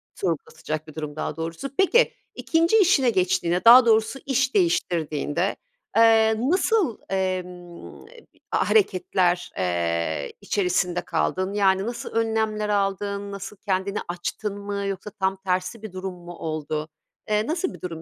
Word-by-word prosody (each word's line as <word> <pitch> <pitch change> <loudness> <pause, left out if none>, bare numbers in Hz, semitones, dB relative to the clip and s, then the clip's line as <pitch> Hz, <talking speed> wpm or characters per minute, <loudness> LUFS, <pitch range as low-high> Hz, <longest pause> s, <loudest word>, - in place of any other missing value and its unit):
Sorgulatacak 160 -2 -4
bir 155 - -12
durum, 150 -2 -5
daha 155 - -3
doğrusu. 165 +10 -4
Peki, 430 +6 +4 0.2
2'nci 335 +6 +2
işine 330 -10 +4
geçtiğinde, 180 -3 +1
daha 240 +2 +10
doğrusu 225 +3 +2
iş 265 -1 0
değiştirdiğinde, 175 - 0 0.4
eee, 225 -1 +5
nasıl, 375 - +2
emm, 180 -2 -4 0.5
hareketler, 185 - +1
eee, 85 -4 -1
içerisinde 180 -2 0
kaldın? 185 +1 -1
Yani, 195 -2 +3
nasıl 235 0 -5
önlemler 220 -2 0
aldın? 200 0 -1
Nasıl, 200 +1 -7
kendini 195 0 -2
açtın 180 +4 -4
mı 200 0 -4
yoksa 195 +1 -4
tam 190 -1 -1
tersi 190 +3 -2
bir 220 - -8
durum 185 0 -5
mu 175 0 -10
oldu? 155 -1 -4 0.4
Eee, 210 +1 +1
nasıl 345 +3 -1
bir - - -13
durum 165 -3 -6
195 Hz, 130 wpm, -24 LUFS, 175-220 Hz, 0.5 s, daha